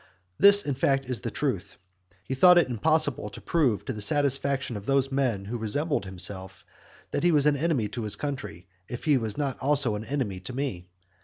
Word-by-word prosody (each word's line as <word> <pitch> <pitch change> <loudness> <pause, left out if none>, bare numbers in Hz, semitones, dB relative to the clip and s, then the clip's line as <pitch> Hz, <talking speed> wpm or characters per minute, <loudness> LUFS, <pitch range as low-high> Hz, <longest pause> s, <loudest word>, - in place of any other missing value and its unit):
This, 200 0 +7
in 145 - -1
fact, 135 +1 +1
is 125 -3 -3
the - - -4
truth. - - -3 0.5
He 130 - -4
thought 180 +7 +6
it 175 - +4
impossible 145 -1 +1
to - - -10
prove 135 -11 0
to - - -3
the 105 - -7
satisfaction 140 -1 0
of 100 -1 -8
those 135 0 +1
men 125 -8 -1
who 115 +4 -5
resembled 145 +3 -1
himself, 95 0 -5 0.5
that - - -1
he 175 - +3
was 150 -3 +3
an 150 -1 +4
enemy 140 -7 0
to 120 - -5
his 105 -2 -1
country, 105 - -6 0.2
if 120 - -6
he 150 -2 +3
was 110 -2 -4
not 140 -3 -2
also 140 -4 +2
an 105 +1 -5
enemy 120 -10 -3
to 95 +7 -8
me. 125 -10 -4
135 Hz, 205 wpm, -26 LUFS, 105-145 Hz, 0.5 s, This